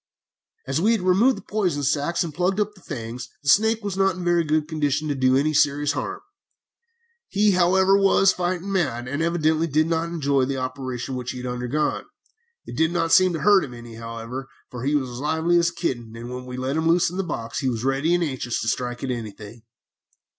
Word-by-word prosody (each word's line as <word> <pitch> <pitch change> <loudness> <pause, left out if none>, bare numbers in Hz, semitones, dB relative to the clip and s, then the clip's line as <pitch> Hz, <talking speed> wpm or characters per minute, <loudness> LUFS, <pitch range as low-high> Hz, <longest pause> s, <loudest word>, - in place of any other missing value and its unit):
"As 135 +4 -1
we 220 +5 +4
had 220 - 0
removed 195 +8 +3
the - - -10
poison 180 -9 -1
sacs 145 +5 +1
and 165 -3 -6
plugged 185 +5 0
up 210 0 0
the 190 - -19
fangs, 120 -4 -6
this 140 - +6
snake 220 +1 +2
was 200 -2 -3
not 195 -1 +2
in 185 - -7
a - - -6
very 175 -1 +3
good 155 -1 0
condition 155 -1 -1
to - - +1
do 130 -1 +3
any 155 +3 +1
serious 145 0 +2
harm. 390 - -4 1.1
He, 205 0 +3
however, 190 +1 +4
was 195 -1 +4
fighting 180 +2 -2
mad, 130 -11 -1
and 140 +4 -3
evidently 165 -1 +1
did 155 +1 +2
not 165 0 -1
enjoy 140 -5 +1
the 135 +1 -3
operation 130 0 -4
which 125 -1 -4
he - - -8
had 125 - -6
undergone. 125 +4 -2 0.6
It - - -8
did 160 +1 +2
not 165 -2 0
seem 185 -1 +6
to 165 - -3
hurt 205 -1 +5
him 125 -3 -7
any, 120 -1 -11
however, 115 +3 -7 0.2
for 125 0 -6
he 145 +2 +1
was 135 -3 0
as 120 0 -8
lively 160 +4 +2
as 170 0 +2
a 170 - -14
kitten 120 -10 -3
when 125 +2 -7
we 125 0 -6
let 130 +3 -2
him 160 0 0
loose 170 0 +3
in 180 - -6
the 195 - 0
box, 115 -8 -4
and 135 - +1
was 115 -1 -4
ready 135 +6 +1
and 175 - +1
anxious 130 -5 -2
to - - -4
strike 120 +2 -2
at 135 - -1
anything. 110 -1 -7
150 Hz, 225 wpm, -23 LUFS, 125-175 Hz, 1.1 s, this